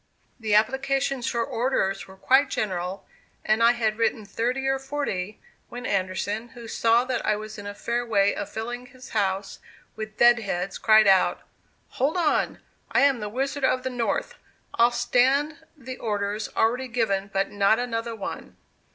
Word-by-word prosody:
The 215 Hz, -2 st, +1 dB
applications 270 Hz, +3 st, +1 dB
for 235 Hz, -1 st, 0 dB
orders 225 Hz, -6 st, -1 dB
were 190 Hz, -, -13 dB
quite 265 Hz, +7 st, +3 dB
general, 185 Hz, -2 st, -3 dB, 0.4 s
and 215 Hz, +1 st, +2 dB
I 235 Hz, +1 st, +6 dB
had 220 Hz, -2 st, -1 dB
written 225 Hz, -1 st, 0 dB
thirty 245 Hz, +6 st, -2 dB
or 270 Hz, 0 st, +1 dB
forty, 265 Hz, -9 st, -4 dB, 0.3 s
when 245 Hz, +1 st, -7 dB
Anderson, 200 Hz, +3 st, -2 dB
who 235 Hz, -1 st, -9 dB
saw 230 Hz, +2 st, +2 dB
that 255 Hz, -1 st, -2 dB
I 210 Hz, -, +2 dB
was 215 Hz, 0 st, -7 dB
in 205 Hz, -, -7 dB
a 205 Hz, -, -6 dB
fair 235 Hz, +3 st, -2 dB
way 205 Hz, -4 st, +2 dB
of 205 Hz, -, -5 dB
filling 240 Hz, +3 st, -5 dB
his 255 Hz, -1 st, -14 dB
house 195 Hz, -2 st, -1 dB, 0.4 s
with 215 Hz, 0 st, -7 dB
"dead 240 Hz, 0 st, +6 dB
heads," 190 Hz, -2 st, -3 dB
cried 215 Hz, -1 st, +6 dB
out 190 Hz, -2 st, +4 dB, 0.5 s
"Hold 285 Hz, +7 st, 0 dB
on! 335 Hz, -4 st, +1 dB, 0.3 s
I -, -, +3 dB
am 275 Hz, -3 st, +4 dB
the 210 Hz, -1 st, -4 dB
'Wizard 275 Hz, +5 st, -2 dB
of 255 Hz, -1 st, +2 dB
the 260 Hz, -, -2 dB
North.' 245 Hz, -, -1 dB, 0.4 s
I'll 235 Hz, +1 st, +5 dB
stand 260 Hz, +5 st, +2 dB, 0.2 s
the 260 Hz, -2 st, -8 dB
orders 205 Hz, -1 st, -2 dB
already 245 Hz, +4 st, +2 dB
given, 210 Hz, -5 st, -1 dB
but 195 Hz, 0 st, 0 dB
not 205 Hz, +2 st, +3 dB
another 230 Hz, -1 st, -3 dB
one." 205 Hz, -, -7 dB
230 Hz, 170 wpm, -25 LUFS, 205-255 Hz, 0.5 s, I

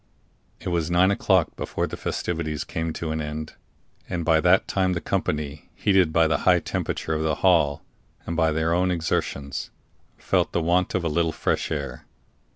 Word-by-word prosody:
It -, -, -4 dB
was 85 Hz, -2 st, 0 dB
nine 90 Hz, +2 st, +4 dB
o'clock 95 Hz, -4 st, +2 dB
before -, -, -2 dB
the -, -, -6 dB
festivities 80 Hz, -3 st, -3 dB
came 80 Hz, -2 st, -3 dB
to 80 Hz, -1 st, -4 dB
an 80 Hz, 0 st, -2 dB
end, 75 Hz, +1 st, -5 dB, 0.6 s
and 85 Hz, -3 st, -2 dB
by 80 Hz, -1 st, +4 dB
that 90 Hz, +4 st, +4 dB
time 95 Hz, -1 st, +1 dB
the 85 Hz, -, -1 dB
company, 75 Hz, -2 st, -3 dB
heated 95 Hz, -5 st, +3 dB
by 80 Hz, +1 st, +4 dB
the 80 Hz, -, +1 dB
high -, -, +4 dB
temperature 80 Hz, -, -3 dB
of 80 Hz, -, -1 dB
the 80 Hz, -1 st, +1 dB
hall, 80 Hz, -6 st, +3 dB, 0.4 s
and 85 Hz, -, -3 dB
by 80 Hz, -1 st, +2 dB
their 80 Hz, +2 st, +1 dB
own 90 Hz, +1 st, +2 dB
exertions, 80 Hz, -5 st, -2 dB, 0.5 s
felt -, -, 0 dB
the 85 Hz, -, +1 dB
want 90 Hz, +3 st, +1 dB
of 95 Hz, -, 0 dB
a -, -, 0 dB
little 80 Hz, +1 st, +1 dB
fresh -, -, -1 dB
air. 70 Hz, -2 st, -4 dB
80 Hz, 180 wpm, -24 LUFS, 80-90 Hz, 0.6 s, nine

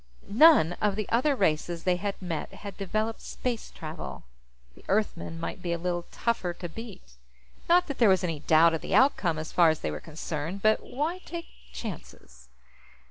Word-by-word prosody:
None 235 Hz, -, +6 dB
of 210 Hz, -2 st, +2 dB
the 215 Hz, -1 st, -3 dB
other 265 Hz, +5 st, +2 dB
races 170 Hz, -4 st, 0 dB
they 180 Hz, -1 st, +2 dB
had 200 Hz, +1 st, -3 dB
met 170 Hz, -4 st, -4 dB
had 200 Hz, -2 st, -9 dB
developed 215 Hz, +3 st, -2 dB
space 240 Hz, -3 st, -4 dB
travel; 155 Hz, 0 st, -7 dB, 0.5 s
the -, -, -18 dB
Earthmen 195 Hz, -5 st, -1 dB
might 175 Hz, +3 st, -5 dB
be 175 Hz, -1 st, -2 dB
a -, -, -1 dB
little 175 Hz, 0 st, -3 dB
tougher 230 Hz, -7 st, -1 dB
to 175 Hz, -, -6 dB
beat. 180 Hz, -, -10 dB, 0.5 s
Not 355 Hz, +1 st, +5 dB
that 280 Hz, -, -6 dB
there 230 Hz, -4 st, +6 dB
was 190 Hz, -1 st, +3 dB
any 165 Hz, -4 st, -2 dB
doubt 160 Hz, +2 st, +5 dB
of 160 Hz, -, -2 dB
the -, -, -1 dB
outcome, 195 Hz, -, +3 dB
as 155 Hz, 0 st, -5 dB
far 170 Hz, -2 st, +5 dB
as 155 Hz, -, -1 dB
they -, -, -2 dB
were 75 Hz, -, -5 dB
concerned 160 Hz, -, -5 dB
but 215 Hz, 0 st, +4 dB
why 315 Hz, +7 st, -3 dB
take 340 Hz, -2 st, -7 dB, 0.3 s
chances? 65 Hz, -, -9 dB
185 Hz, 185 wpm, -28 LUFS, 165-225 Hz, 0.5 s, None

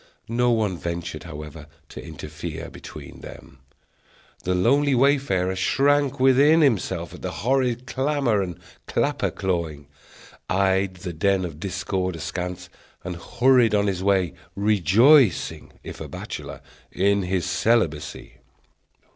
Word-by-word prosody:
No 120 Hz, +1 st, +2 dB
one 105 Hz, -7 st, 0 dB
ventured, 85 Hz, -1 st, -5 dB
however, 75 Hz, -1 st, -9 dB, 0.2 s
to -, -, -9 dB
interfere 80 Hz, +1 st, -7 dB
between -, -, -11 dB
them. 70 Hz, -, -12 dB, 0.9 s
The 90 Hz, 0 st, +1 dB
lonely 135 Hz, +9 st, +3 dB
wayfarer 125 Hz, -9 st, +2 dB
shrank 140 Hz, +8 st, +2 dB
within 140 Hz, +5 st, +5 dB
himself 95 Hz, -, 0 dB
at -, -, -11 dB
the -, -, -3 dB
horrid 125 Hz, +1 st, 0 dB
clamor 135 Hz, -5 st, 0 dB
and 90 Hz, -3 st, -4 dB, 0.3 s
clapper -, -, 0 dB
clawing; 85 Hz, -6 st, -3 dB, 0.6 s
eyed 95 Hz, 0 st, +1 dB
the 90 Hz, -1 st, -6 dB
den 95 Hz, +3 st, +1 dB
of 80 Hz, -3 st, -8 dB
discord 95 Hz, 0 st, -2 dB
askance; 90 Hz, +2 st, -5 dB, 0.4 s
and 90 Hz, 0 st, -5 dB
hurried 120 Hz, +4 st, +3 dB
on 100 Hz, 0 st, +2 dB
his 95 Hz, -3 st, -1 dB
way, 95 Hz, -4 st, +2 dB, 0.2 s
rejoicing, 105 Hz, -, +3 dB
if -, -, -9 dB
a -, -, -5 dB
bachelor, -, -, -7 dB, 0.3 s
in 100 Hz, +2 st, +2 dB
his 90 Hz, -1 st, -1 dB
celibacy. 95 Hz, -4 st, 0 dB
95 Hz, 120 wpm, -24 LUFS, 85-125 Hz, 0.9 s, within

